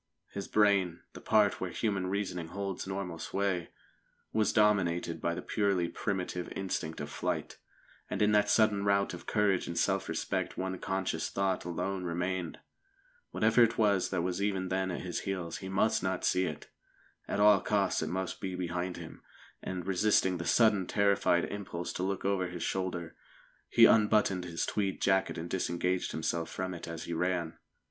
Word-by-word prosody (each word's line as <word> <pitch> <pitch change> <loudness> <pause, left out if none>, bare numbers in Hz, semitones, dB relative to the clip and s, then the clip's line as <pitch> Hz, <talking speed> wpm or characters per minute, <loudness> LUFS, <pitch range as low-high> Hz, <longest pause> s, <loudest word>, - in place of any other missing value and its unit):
His 100 -1 -5
brain 100 -5 +3
the - - -10
part 105 -2 +3
where 95 - -2
human 100 -2 -1
reasoning 95 -3 -2
holds 100 +1 -4
normal 95 -4 -4
sway 95 -3 -1 0.6
was 110 -1 +2
dominated 90 -6 +2
by 85 0 0
the - - -6
purely 100 -5 +1
primitive 90 -3 -3
instinct 90 -4 -3
of 75 - -5
flight. - - -3 0.5
And - - -3
in 105 0 +4
that 105 -1 +3
sudden 105 -2 +3
rout 100 0 +2
of - - -9
courage 105 -3 +2
and 85 - -4
self - - +1
respect - - -2
one 95 0 -3
conscious 95 -4 -2
thought 95 -2 -1
alone 95 +2 -3
remained. 90 0 -2 0.7
Whatever 110 +2 +3
it 115 -1 +4
was 100 -4 +3
that 90 -3 -1
was 90 +1 -2
even 95 -2 -1
then 95 0 0
at 90 - -3
his 90 -2 -3
heels, 90 -4 -4
he 95 - -7
must 95 +3 +2
not 95 0 -1
see 90 0 +2
it. 80 -4 -6 0.6
At - - -2
all 105 -2 +6
costs 100 -3 +1
it 80 - -2
must 95 +1 -3
be 95 -2 -3
behind 90 0 -3
him, - - -10 0.4
and, 90 -2 -5
resisting 95 -1 +2
the 85 - -4
sudden 105 -5 +4
terrified 100 -3 +2
impulse 90 -4 -5
to - - -4
look 95 +1 -2
over 95 -2 +1
his 90 -1 -6
shoulder, 90 -3 -3 0.5
he - - +7
unbuttoned 105 -4 +4
his 85 -1 -2
tweed 100 -2 -1
jacket 95 0 +2
and 85 +1 -4
disengaged 90 0 -1
himself 80 +1 -2
from 95 0 -4
it 85 - -7
as 85 -1 -6
he 85 - -4
ran. 85 -1 -1
95 Hz, 175 wpm, -31 LUFS, 90-100 Hz, 0.7 s, he